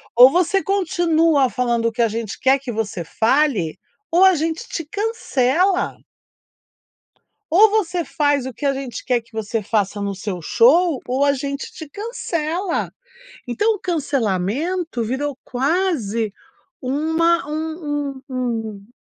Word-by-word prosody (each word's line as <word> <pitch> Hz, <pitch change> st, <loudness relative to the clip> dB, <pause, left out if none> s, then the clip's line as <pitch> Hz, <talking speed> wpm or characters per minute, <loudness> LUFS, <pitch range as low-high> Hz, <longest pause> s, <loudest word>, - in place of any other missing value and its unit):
ou 250 Hz, +2 st, +9 dB
você 365 Hz, +4 st, +2 dB
continua 330 Hz, -7 st, +2 dB
falando 240 Hz, -2 st, 0 dB
o -, -, 0 dB
que 225 Hz, -, -2 dB
a 230 Hz, -, +4 dB
gente 225 Hz, -1 st, -5 dB
quer 265 Hz, +1 st, +4 dB
que 260 Hz, -2 st, -6 dB
você 210 Hz, -5 st, -3 dB
fale 225 Hz, -, +1 dB, 0.3 s
ou 350 Hz, +3 st, +6 dB
a 380 Hz, -1 st, +6 dB
gente 320 Hz, +1 st, -2 dB
te 330 Hz, -, -4 dB
cancela." 370 Hz, -, 0 dB, 1.5 s
"Ou 415 Hz, +6 st, +7 dB
você 365 Hz, -5 st, 0 dB
faz 290 Hz, -4 st, 0 dB
o 260 Hz, -, -5 dB
que 290 Hz, -, -6 dB
a 275 Hz, -, +3 dB
gente 270 Hz, -3 st, -6 dB
quer 250 Hz, -2 st, +1 dB
que 230 Hz, -, -27 dB
você 220 Hz, 0 st, -3 dB
faça 205 Hz, -1 st, -1 dB
no 200 Hz, 0 st, -2 dB
seu 190 Hz, -2 st, -5 dB
show 295 Hz, -, +4 dB
ou 260 Hz, +3 st, +1 dB
a 285 Hz, 0 st, +4 dB
gente 280 Hz, +1 st, -4 dB
te 315 Hz, -, -9 dB
cancela." 360 Hz, -, -3 dB, 0.6 s
Então, 420 Hz, -, +1 dB
o -, -, -6 dB
cancelamento 285 Hz, -, -1 dB
virou 265 Hz, +4 st, -2 dB
quase 255 Hz, -, 0 dB, 0.5 s
uma 320 Hz, +5 st, +1 dB
um 300 Hz, -3 st, -3 dB
um -, -, -36 dB
um 225 Hz, -5 st, -3 dB
280 Hz, 140 wpm, -21 LUFS, 235-335 Hz, 1.5 s, ou